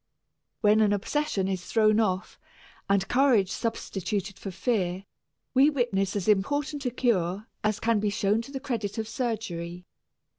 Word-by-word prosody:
When 215 Hz, 0 st, +5 dB
an 205 Hz, -1 st, +4 dB
obsession 205 Hz, -1 st, -1 dB
is 190 Hz, -2 st, -2 dB
thrown 215 Hz, 0 st, +3 dB
off 190 Hz, -4 st, -1 dB, 0.5 s
and 195 Hz, -1 st, +2 dB
courage 245 Hz, -8 st, +3 dB
substituted 195 Hz, -3 st, -3 dB
for 195 Hz, -, -5 dB
fear, 190 Hz, -2 st, -1 dB, 0.5 s
we 270 Hz, +3 st, +6 dB
witness 230 Hz, -9 st, 0 dB
as 200 Hz, -1 st, -2 dB
important 280 Hz, +7 st, +1 dB
a -, -, +2 dB
"cure" 210 Hz, -5 st, 0 dB, 0.2 s
as 215 Hz, -1 st, +1 dB
can 230 Hz, -1 st, +2 dB
be 210 Hz, 0 st, +1 dB
shown 205 Hz, +2 st, +1 dB
to 235 Hz, -, -11 dB
the 270 Hz, -, -4 dB
credit 230 Hz, -7 st, -3 dB
of 220 Hz, -1 st, -2 dB
surgery. 195 Hz, -7 st, -4 dB
210 Hz, 150 wpm, -27 LUFS, 195-240 Hz, 0.5 s, we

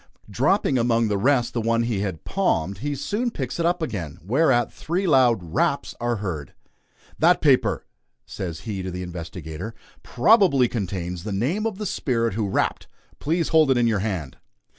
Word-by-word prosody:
Dropping 135 Hz, -, +2 dB
among 115 Hz, -1 st, +2 dB
the 100 Hz, -, +1 dB
rest 125 Hz, +1 st, +2 dB
the 120 Hz, -, -1 dB
one 115 Hz, +1 st, +1 dB
he 115 Hz, -4 st, -1 dB
had 95 Hz, -5 st, -4 dB
"palmed," 95 Hz, -, 0 dB
he 145 Hz, +3 st, -2 dB
soon 205 Hz, -, -1 dB
picks 135 Hz, -, -5 dB
it 170 Hz, -, +2 dB
up 175 Hz, -1 st, 0 dB
again, 85 Hz, -, -4 dB
whereat 120 Hz, -, +2 dB
three 180 Hz, +5 st, -2 dB
loud 120 Hz, -, +3 dB
"raps" -, -, 0 dB
are 120 Hz, 0 st, 0 dB
heard. 90 Hz, -, -5 dB, 0.6 s
"That -, -, +5 dB
paper," -, -, +2 dB, 0.4 s
says 85 Hz, -4 st, -6 dB
he 100 Hz, -4 st, -4 dB
to 95 Hz, -, -4 dB
the 90 Hz, 0 st, -5 dB
investigator, 85 Hz, +3 st, -7 dB, 0.3 s
"probably 155 Hz, -, +4 dB
contains 90 Hz, -6 st, -4 dB
the 105 Hz, -, -4 dB
name 150 Hz, -, 0 dB
of 215 Hz, -4 st, -5 dB
the 210 Hz, -, -4 dB
spirit 115 Hz, -, -1 dB
who 105 Hz, -1 st, -1 dB
rapped; -, -, -1 dB, 0.3 s
please 165 Hz, +3 st, 0 dB
hold 160 Hz, -3 st, +4 dB
it 130 Hz, -, +4 dB
in 120 Hz, -, +3 dB
your 110 Hz, -3 st, +2 dB
hand." 95 Hz, -9 st, -3 dB
115 Hz, 175 wpm, -24 LUFS, 95-145 Hz, 0.6 s, That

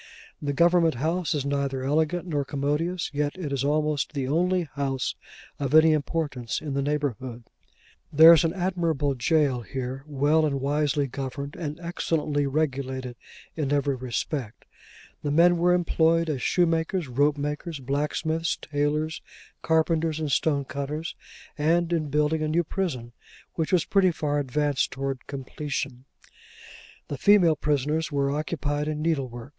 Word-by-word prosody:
The 145 Hz, -, -1 dB
Government 170 Hz, +1 st, +3 dB
House 165 Hz, +5 st, -1 dB
is 140 Hz, -2 st, -2 dB
neither 140 Hz, -2 st, -1 dB
elegant 160 Hz, +5 st, 0 dB
nor 150 Hz, -5 st, -1 dB
commodious, 150 Hz, +6 st, -2 dB
yet 145 Hz, +3 st, -1 dB
it 155 Hz, -7 st, -4 dB
is 135 Hz, -1 st, -1 dB
almost 150 Hz, 0 st, 0 dB
the 135 Hz, -3 st, -2 dB
only 180 Hz, +5 st, +1 dB
house 135 Hz, -2 st, -1 dB, 0.5 s
of 140 Hz, +1 st, 0 dB
any 155 Hz, 0 st, +7 dB
importance 145 Hz, -5 st, -2 dB
in 150 Hz, -3 st, -5 dB
the 140 Hz, -, 0 dB
neighbourhood. 130 Hz, -5 st, -2 dB, 0.7 s
There 160 Hz, +3 st, +9 dB
is 165 Hz, -, +4 dB
an 165 Hz, -, +1 dB
admirable 170 Hz, -6 st, 0 dB
jail 135 Hz, -1 st, +1 dB
here, 130 Hz, +2 st, -5 dB
well 150 Hz, +2 st, +2 dB
and 140 Hz, -3 st, 0 dB
wisely 145 Hz, +1 st, +1 dB
governed, 140 Hz, +2 st, -5 dB
and 150 Hz, -1 st, -5 dB
excellently 155 Hz, -4 st, -1 dB
regulated, 130 Hz, -3 st, -2 dB, 0.4 s
in 145 Hz, -4 st, -2 dB
every 145 Hz, -1 st, +1 dB
respect. 130 Hz, -1 st, -4 dB, 0.6 s
The 145 Hz, -, -2 dB
men 170 Hz, +4 st, +5 dB
were 175 Hz, +1 st, +3 dB
employed 165 Hz, -2 st, +2 dB
as 135 Hz, -4 st, -3 dB
shoemakers, 165 Hz, -1 st, +1 dB
ropemakers, 145 Hz, +4 st, -1 dB
blacksmiths, 150 Hz, +4 st, -1 dB
tailors, 150 Hz, +2 st, -1 dB, 0.4 s
carpenters, 160 Hz, 0 st, +1 dB
and 155 Hz, -2 st, -2 dB
stonecutters; 145 Hz, +2 st, -1 dB, 0.5 s
and 170 Hz, +3 st, +2 dB
in 155 Hz, -3 st, -1 dB
building 150 Hz, +2 st, +1 dB
a 155 Hz, -, 0 dB
new 165 Hz, +3 st, +1 dB
prison, 150 Hz, -, -3 dB, 0.4 s
which 160 Hz, -2 st, -2 dB
was 180 Hz, -4 st, +3 dB
pretty 195 Hz, -2 st, +3 dB
far 150 Hz, -3 st, -1 dB
advanced 145 Hz, 0 st, 0 dB
towards 135 Hz, -1 st, -4 dB
completion. 135 Hz, -2 st, -5 dB, 1.0 s
The 145 Hz, -, -5 dB
female 185 Hz, -5 st, +5 dB
prisoners 150 Hz, +2 st, 0 dB
were 140 Hz, -1 st, +1 dB
occupied 150 Hz, 0 st, -2 dB
in 155 Hz, 0 st, -2 dB
needlework. 130 Hz, -6 st, -2 dB
150 Hz, 140 wpm, -26 LUFS, 140-160 Hz, 1.0 s, There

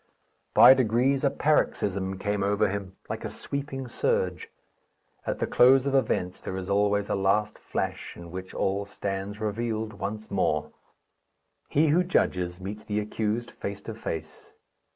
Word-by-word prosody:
By -, -, +10 dB
degrees 130 Hz, +2 st, +2 dB
a 140 Hz, -, +5 dB
paroxysm 100 Hz, -11 st, +1 dB
came 105 Hz, +1 st, -1 dB
over 100 Hz, +1 st, +2 dB
him, 100 Hz, -1 st, -5 dB
like -, -, -5 dB
a -, -, -3 dB
sweeping 135 Hz, -2 st, -5 dB
surge. 470 Hz, -, -1 dB, 0.8 s
At -, -, -1 dB
the -, -, 0 dB
close 130 Hz, +2 st, +5 dB
of 140 Hz, -, 0 dB
events 110 Hz, -8 st, 0 dB
there 95 Hz, -, -4 dB
is 95 Hz, +1 st, -4 dB
always 100 Hz, 0 st, +2 dB
a -, -, -1 dB
last 100 Hz, +2 st, +1 dB
flash, -, -, -4 dB
in 85 Hz, -1 st, -10 dB
which 95 Hz, +1 st, -7 dB
all 100 Hz, +1 st, 0 dB
stands 100 Hz, 0 st, -4 dB
revealed 110 Hz, 0 st, -2 dB
once 105 Hz, +2 st, -5 dB
more. 75 Hz, -6 st, 0 dB, 1.0 s
He 155 Hz, +2 st, +3 dB
who 170 Hz, +5 st, +4 dB
judges 90 Hz, -, 0 dB
meets 105 Hz, +3 st, -6 dB
the 105 Hz, 0 st, -1 dB
accused 110 Hz, +2 st, -2 dB
face 100 Hz, 0 st, -6 dB
to 115 Hz, -, -6 dB
face. 80 Hz, -8 st, -6 dB
105 Hz, 150 wpm, -27 LUFS, 95-125 Hz, 1.0 s, By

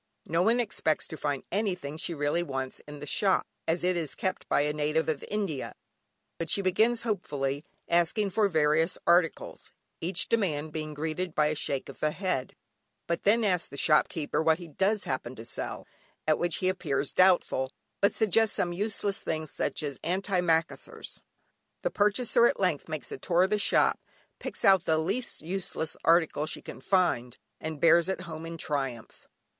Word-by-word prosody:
No 165 Hz, +2 st, +1 dB
one 230 Hz, +6 st, +3 dB
expects 205 Hz, -9 st, 0 dB
to -, -, -5 dB
find 145 Hz, -3 st, -2 dB
anything 180 Hz, -8 st, -1 dB
she 165 Hz, +1 st, -1 dB
really 145 Hz, +3 st, +1 dB
wants 135 Hz, -5 st, -4 dB
in 150 Hz, 0 st, -8 dB
the 145 Hz, -, -7 dB
shop, 190 Hz, +6 st, +2 dB, 0.2 s
as 165 Hz, +2 st, +1 dB
it 180 Hz, 0 st, +2 dB
is 155 Hz, -7 st, -2 dB
kept 185 Hz, 0 st, -3 dB
by -, -, +3 dB
a 150 Hz, +1 st, 0 dB
native 150 Hz, +2 st, 0 dB
of 155 Hz, -3 st, -1 dB
India, 195 Hz, -10 st, -2 dB, 0.7 s
but 165 Hz, -1 st, -3 dB
she 200 Hz, -, +1 dB
begins 220 Hz, +6 st, +2 dB
hopefully 145 Hz, -, -2 dB, 0.2 s
asking 175 Hz, +4 st, +2 dB
for 210 Hz, +2 st, +3 dB
various 160 Hz, 0 st, +2 dB
articles, 170 Hz, -2 st, +1 dB, 0.3 s
each 180 Hz, +4 st, 0 dB
demand 155 Hz, -9 st, 0 dB
being 155 Hz, -1 st, -4 dB
greeted 160 Hz, +3 st, -3 dB
by 150 Hz, 0 st, +3 dB
a 155 Hz, -, -1 dB
shake 140 Hz, -2 st, -2 dB
of -, -, -11 dB
the 155 Hz, -, +2 dB
head. 180 Hz, -6 st, -2 dB, 0.6 s
She -, -, +4 dB
then 225 Hz, +3 st, +3 dB
asks 180 Hz, -4 st, +1 dB
the 140 Hz, -, -9 dB
shopkeeper 150 Hz, +1 st, +2 dB
what 160 Hz, 0 st, +3 dB
he 175 Hz, -1 st, -9 dB
does 195 Hz, +7 st, +1 dB
happen 130 Hz, -1 st, -3 dB
to 115 Hz, -, -9 dB
sell, 115 Hz, -, -5 dB, 0.4 s
at 155 Hz, -1 st, +2 dB
which 175 Hz, -1 st, +1 dB
he 185 Hz, -, 0 dB
appears 145 Hz, -7 st, -1 dB
doubtful, 180 Hz, -8 st, +3 dB, 0.3 s
but 200 Hz, -, +3 dB
suggests 220 Hz, 0 st, +3 dB
some 175 Hz, -1 st, 0 dB
useless 200 Hz, +1 st, -1 dB
thing 155 Hz, 0 st, -3 dB
such 155 Hz, -, -3 dB
as 140 Hz, -2 st, -4 dB
antimacassars. 180 Hz, -3 st, -1 dB, 0.6 s
The -, -, 0 dB
purchaser 235 Hz, +3 st, +3 dB
at -, -, -1 dB
length 180 Hz, -6 st, 0 dB
makes 155 Hz, -2 st, -4 dB
a -, -, -5 dB
tour 175 Hz, +5 st, +3 dB
of 190 Hz, -, 0 dB
the 210 Hz, -, +2 dB
shop, -, -, +3 dB, 0.4 s
picks -, -, -5 dB
out 190 Hz, -3 st, +6 dB
the 160 Hz, -, +3 dB
least 195 Hz, +6 st, -2 dB
useless 175 Hz, -2 st, -3 dB
article 165 Hz, -2 st, +3 dB
she -, -, -5 dB
can -, -, -9 dB
find, 135 Hz, -11 st, +1 dB, 0.2 s
and 160 Hz, -2 st, -5 dB
bears 170 Hz, +2 st, +5 dB
it 190 Hz, -, -2 dB
home 165 Hz, -2 st, -7 dB
in 165 Hz, 0 st, -6 dB
triumph. 135 Hz, -7 st, -4 dB
165 Hz, 180 wpm, -29 LUFS, 150-190 Hz, 0.7 s, out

